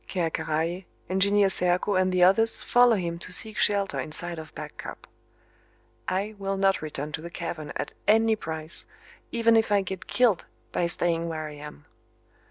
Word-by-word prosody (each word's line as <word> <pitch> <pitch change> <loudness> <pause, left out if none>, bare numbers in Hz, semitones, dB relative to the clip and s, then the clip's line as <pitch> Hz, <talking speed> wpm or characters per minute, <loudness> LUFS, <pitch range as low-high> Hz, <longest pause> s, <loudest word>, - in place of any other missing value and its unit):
Ker 170 -4 -1
Karraje, 165 +5 -2 0.3
Engineer 200 +1 +3
Serko 180 +2 +2
and 185 0 +2
the 180 -1 +3
others 225 +5 +4
follow 245 -1 +5
him 170 -3 -3
to 180 - -6
seek 215 +3 0
shelter 200 -8 +2
inside 170 +4 -3
of 155 -1 -10
Back 150 -1 -8
Cup. - - -8 1.0
I 200 +3 -1
will 195 0 -2
not 195 0 +2
return 150 -1 -5
to 155 +1 -4
the 170 - -7
cavern 170 -3 -5
at - - -4
any 225 +1 +4
price, 160 -4 -5 0.4
even 230 -1 +3
if 225 -1 +2
I 200 -1 +3
get 190 0 -6
killed 240 -8 +2 0.3
by 175 - 0
staying 170 0 0
where 155 -1 -4
I 150 - -7
am. 145 - -11
180 Hz, 175 wpm, -26 LUFS, 160-200 Hz, 1.0 s, follow